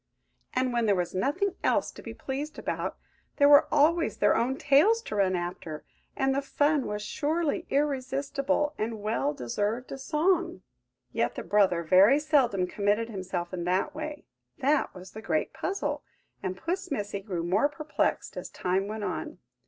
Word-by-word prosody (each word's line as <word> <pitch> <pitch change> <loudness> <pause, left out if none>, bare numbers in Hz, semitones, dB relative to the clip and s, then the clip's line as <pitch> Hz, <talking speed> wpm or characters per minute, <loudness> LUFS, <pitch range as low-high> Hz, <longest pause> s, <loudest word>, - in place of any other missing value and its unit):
And 255 -1 +1
when 235 -2 +1
there 200 - +4
was 180 -2 -2
nothing 315 - 0
else - - +2
to - - -12
be - - -7
pleased 285 +3 -5
about, - - -3 0.4
there 285 - +5
were 290 0 +7
always 320 +3 +3
their - - +4
own 260 +3 +1
tails 300 +12 +4
to - - -5
run 190 -2 +2
after, 175 -3 -5 0.3
and 270 -1 +1
the 275 - 0
fun 290 0 +1
was 210 0 -3
surely 310 +7 -1
irresistible, 280 +1 0
and 220 -1 -3
well 145 -10 0
deserved 205 - -3
a 270 - -5
song. 345 +5 0 0.5
Yet - - 0
the - - -5
brother 190 -5 +3
very 190 - +6
seldom 275 -11 +2
committed 205 +4 0
himself 185 -4 -4
in 175 -2 -3
that 185 +2 0
way–that 300 -2 -2
was 185 +1 -10
the 220 - -8
great 160 -7 -1
puzzle, 390 +1 -2 0.4
and 185 0 -3
Puss 370 - -3
Missy 205 -7 -3
grew 190 -4 -4
more 200 +11 +2
perplexed 305 +1 -2
as - - -5
time 190 +2 -1
went 215 0 -5
on. - - -4
250 Hz, 165 wpm, -28 LUFS, 195-295 Hz, 0.5 s, were